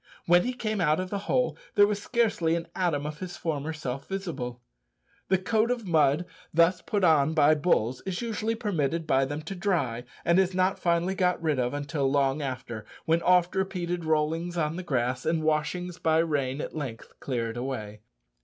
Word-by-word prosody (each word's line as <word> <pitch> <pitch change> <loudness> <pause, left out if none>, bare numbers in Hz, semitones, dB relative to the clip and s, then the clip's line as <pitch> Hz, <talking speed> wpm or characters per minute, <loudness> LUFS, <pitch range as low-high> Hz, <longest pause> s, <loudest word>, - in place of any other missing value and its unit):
When 175 +1 +5
he 250 - -1
came 215 -4 -2
out 155 0 +3
of 185 0 -4
the 200 - -1
hole 250 -1 +2 0.2
there 205 -2 +7
was 205 0 -1
scarcely 210 -9 +1
an 170 0 -4
atom 165 -6 0
of 150 0 -5
his 185 -1 -6
former 155 -1 -2
self 135 -4 -5
visible! 155 -11 -4 0.7
The 190 - +3
coat 220 +4 +1
of 245 -3 -1
mud 155 -1 +3 0.3
thus 170 +2 +3
put 205 -2 -1
on 155 -2 +4
by 150 -1 +6
bulls 135 -6 +1
is 190 -2 -3
usually 225 -1 -2
permitted 165 - -1
by 135 -3 +3
them 145 +3 -5
to 165 - -5
dry, 160 - -1 0.2
and 170 +2 +4
is 190 -1 +1
not 185 +1 +2
finally 170 +2 +1
got 180 -2 +1
rid 155 -5 0
of 125 +2 0
until 145 -1 -1
long 140 +1 +1
after, 125 -5 -5 0.2
when 165 +1 +2
oft 180 0 +4
repeated 180 -2 -2
rollings 160 +2 0
on 155 -1 0
the 185 - -4
grass 130 -6 -1
and 160 0 0
washings 170 +3 -1
by 160 -1 +2
rain 145 -4 0
at - - -6
length 135 -7 -6
clear 120 -4 -2
it - - -10
away. 110 -5 -5
165 Hz, 190 wpm, -27 LUFS, 140-185 Hz, 0.7 s, there